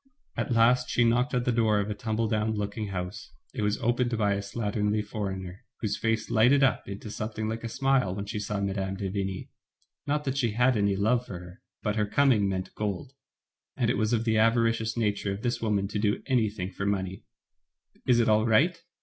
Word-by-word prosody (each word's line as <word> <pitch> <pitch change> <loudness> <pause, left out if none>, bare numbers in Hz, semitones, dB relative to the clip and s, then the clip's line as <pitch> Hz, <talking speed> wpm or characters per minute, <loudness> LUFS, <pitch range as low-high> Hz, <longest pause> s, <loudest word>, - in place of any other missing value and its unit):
At - - -2
last 120 +2 +4
she 120 - +3
knocked 125 +3 +2
at 125 -1 0
the 125 - +2
door 110 -3 +2
of 105 +1 -2
a - - 0
tumble 110 0 -1
down 110 0 0
looking 105 +1 -3
house. 90 0 -6 0.2
It - - -3
was 105 0 +1
opened 120 0 0
by 105 -2 +2
a 100 - -2
slat 105 +1 -4
ternly 105 0 +1
foreigner, 95 -3 -5 0.2
whose 105 -3 -1
face 110 -1 -1
lighted 125 +5 +5
up 135 - +1
into 100 +2 -7
something 110 0 -4
like 115 +1 -4
a 115 - -3
smile 130 -6 +1
when 100 0 -4
she 105 +1 -4
saw 105 0 -3
Mme. 95 -1 -2
de 95 -1 -3
Vigny. 95 -1 -3 0.6
Not 150 +1 0
that 135 -1 -2
she 120 -5 +1
had 125 +3 +3
any 100 -2 +2
love 115 +5 +1
for 95 - -6
her, 90 +1 -12 0.2
but 105 0 -1
her 105 -1 +1
coming 115 -4 +3
meant 95 -1 -3
gold, 105 +5 -4 0.6
and - - +2
it - - -1
was 110 +1 +1
of 115 -2 +1
the 110 -1 +2
avari 115 +1 +4
cious 115 0 -3
nature 105 -3 0
of 100 - -7
this 120 -1 -1
woman 105 -3 +1
to 105 - -2
do 105 0 0
anything 105 -7 0
for 100 +2 -3
money. 95 -2 -2 0.8
Is 120 -2 +5
it 115 - +3
all 110 +1 +3
right? 165 +10 +3
110 Hz, 220 wpm, -28 LUFS, 100-120 Hz, 0.8 s, lighted